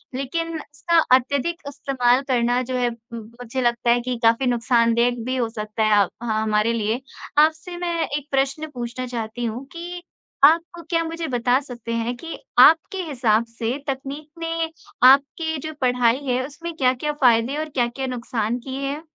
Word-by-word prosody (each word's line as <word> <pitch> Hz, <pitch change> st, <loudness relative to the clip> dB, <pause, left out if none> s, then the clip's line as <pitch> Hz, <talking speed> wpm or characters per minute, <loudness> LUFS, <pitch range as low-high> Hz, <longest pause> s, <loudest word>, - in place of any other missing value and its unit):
लेकिन 330 Hz, +5 st, -3 dB
इसका 295 Hz, +3 st, -1 dB, 0.2 s
अत्यधिक 280 Hz, +6 st, -1 dB
इस्तेमाल 265 Hz, -3 st, +1 dB
करना 245 Hz, -1 st, +2 dB
जो 255 Hz, -, -1 dB
है 245 Hz, -1 st, +1 dB
उम, 235 Hz, 0 st, -9 dB, 0.2 s
मुझे 245 Hz, +2 st, -3 dB
लगता 240 Hz, -1 st, +1 dB
है 240 Hz, +1 st, +5 dB
कि 250 Hz, 0 st, -3 dB
काफ़ी 230 Hz, +3 st, +4 dB
नुकसानदायाक 235 Hz, 0 st, +2 dB
भी 255 Hz, +1 st, -1 dB
हो 245 Hz, -3 st, 0 dB
सकता 215 Hz, 0 st, -3 dB
है 210 Hz, -1 st, +5 dB
अ, -, -, -3 dB, 0.2 s
ह 235 Hz, -, -2 dB, 0.2 s
हमारे 215 Hz, +2 st, +2 dB
लिए। 225 Hz, +2 st, -1 dB, 0.4 s
आपसे 315 Hz, +3 st, +2 dB
मैं 345 Hz, -1 st, -2 dB
एक 290 Hz, 0 st, -4 dB
प्रश्न 275 Hz, +3 st, 0 dB
पूछना 245 Hz, 0 st, -5 dB
चाहती 235 Hz, 0 st, -4 dB
हूँ 235 Hz, +4 st, -4 dB
कि, 350 Hz, 0 st, -7 dB, 0.4 s
आप 320 Hz, +4 st, +7 dB
को 345 Hz, -, -9 dB
क्या 330 Hz, -1 st, +1 dB
मुझे 330 Hz, 0 st, -4 dB
बता 245 Hz, 0 st, +2 dB
सकते 245 Hz, -4 st, -8 dB
हैं 230 Hz, +1 st, -1 dB
कि 330 Hz, +5 st, -7 dB, 0.2 s
आपके 325 Hz, +5 st, +6 dB
हिसाब 240 Hz, -8 st, +1 dB
से 230 Hz, +2 st, -3 dB
तकनीक 275 Hz, +2 st, -5 dB
ने 330 Hz, 0 st, -2 dB, 0.4 s
आपके 285 Hz, +4 st, +3 dB
जो 315 Hz, -, -6 dB
पढ़ाई 245 Hz, -1 st, +3 dB
है, 255 Hz, 0 st, 0 dB
उसमें 330 Hz, +4 st, -7 dB
क्या-क्या 260 Hz, +1 st, +1 dB
फ़ायदे 240 Hz, +2 st, +4 dB
और 310 Hz, 0 st, -3 dB
क्या-क्या 260 Hz, -1 st, -1 dB
नुकसान 240 Hz, -2 st, -2 dB
किए 265 Hz, +2 st, -6 dB
हैं? 285 Hz, +3 st, -3 dB
255 Hz, 170 wpm, -22 LUFS, 235-300 Hz, 0.4 s, आप